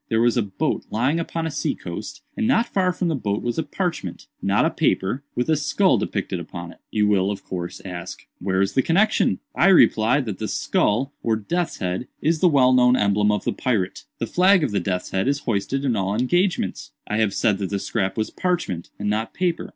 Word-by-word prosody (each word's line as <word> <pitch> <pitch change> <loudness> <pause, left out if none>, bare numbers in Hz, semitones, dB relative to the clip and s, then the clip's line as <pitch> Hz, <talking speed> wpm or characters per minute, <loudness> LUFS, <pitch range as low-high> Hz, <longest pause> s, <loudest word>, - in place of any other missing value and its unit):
There 110 - +2
was 120 0 +3
a 120 - +3
boat 100 -3 -2
lying 130 +9 +1
upon 165 0 -3
a 160 - -2
sea - - -1
coast, - - -7
and 230 - 0
not 235 -2 +3
far 185 -5 +1
from 180 0 -2
the 165 - 0
boat 105 -6 -2
was 120 +5 -1
a - - 0
parchment—not 160 - -2
a - - +1
paper—with 125 +5 -1
a 160 - +3
skull 170 +6 +2
depicted 95 -2 -3
upon 85 0 -7
it. - - -18
You 105 -1 +1
will, 100 -2 +2
of 100 - -4
course, 90 -1 -6
ask 90 -2 -7
'where 95 0 +1
is 100 - -2
the 130 - +3
connexion?' 200 +9 +2 0.2
I 175 - +3
reply 125 - +5
that 110 -7 -5
the - - -2
skull, 130 +7 0
or 115 -1 +1
death's 155 - -2
head, 90 +5 -3
is 160 +1 +1
the 180 - +5
well 130 -4 +4
known 125 0 +5
emblem 105 0 +2
of 105 -2 -1
the - - -1
pirate. 105 -8 -1
The - - -2
flag 185 -1 +4
of 135 - 0
the 100 - +1
death's 90 -2 -3
head 95 +5 0
is 140 +1 +1
hoisted 120 +5 -1
in 125 -4 +1
all 100 0 -1
engagements. 175 - 0
"I 105 - -2
have 110 -3 +1
said 100 -3 +2
that 95 -2 -2
the 100 - -1
scrap 95 0 -2
was 110 - -1
parchment, 165 - -2
and 105 - -4
not 110 +2 -1
paper. 180 -2 -1
115 Hz, 220 wpm, -23 LUFS, 100-160 Hz, 0.2 s, reply